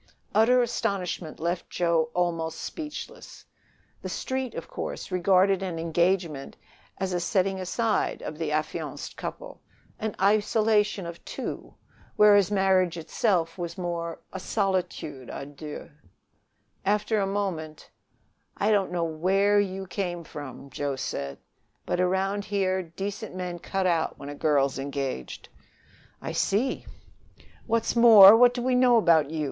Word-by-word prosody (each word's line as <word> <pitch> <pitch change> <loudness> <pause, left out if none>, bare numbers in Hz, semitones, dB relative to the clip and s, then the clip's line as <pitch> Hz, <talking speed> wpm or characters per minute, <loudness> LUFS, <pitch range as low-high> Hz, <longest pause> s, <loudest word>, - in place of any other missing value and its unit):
Utter 245 +3 +5
astonishment 185 -8 -3
left 170 +2 -2
Joe 170 -2 +1
almost 165 -2 -1
speechless. 305 -2 -8 0.6
The - - -5
Street, 260 -2 -3
of - - -6
course, - - -6
regarded 190 +1 +3
an 180 -3 -3
engagement 170 -3 0 0.4
as 190 -1 -2
a 175 - 0
setting 190 +1 0
aside 215 +4 -1
of 155 - -6
the 160 -2 -2
affianced 155 0 -3
couple, - - -7 0.4
an 220 -1 -3
isolation 210 0 +2
of 170 0 -8
two, - - -6 0.4
than 210 0 +7
which 200 -3 +4
marriage 190 -3 +2
itself 165 +1 0
was 170 -1 -5
not 185 - -5
more 170 -1 -3
a 190 - -4
solitude 180 - -2
a - - -6
deux. 145 +1 -9 0.9
After 210 +2 +1
a 195 - 0
moment: 180 -6 -4 0.7
"I 210 +2 +2
don't 200 -4 +2
know 175 -1 -1
where 190 +6 +2
you 195 -1 -2
came 175 -2 -4
from," 140 -2 -9
he 140 +1 -3
said, 70 - -4 0.5
"but - - -1
around 195 +2 0
here 190 -2 0
decent 195 +4 -6
men 180 -1 -4
cut 195 +2 -2
out 170 -3 +1
when 140 - -8
a - - -5
girl's 140 -3 +1
engaged." 135 - -5 0.7
"I - - -3
see!" 225 +7 0 0.8
"What's 230 0 0
more, 220 -4 +10
what 245 +1 +5
do 245 - -3
we 255 0 +1
know 250 -1 +5
about 165 -8 +4
you? 160 0 -4
185 Hz, 140 wpm, -26 LUFS, 165-205 Hz, 0.9 s, more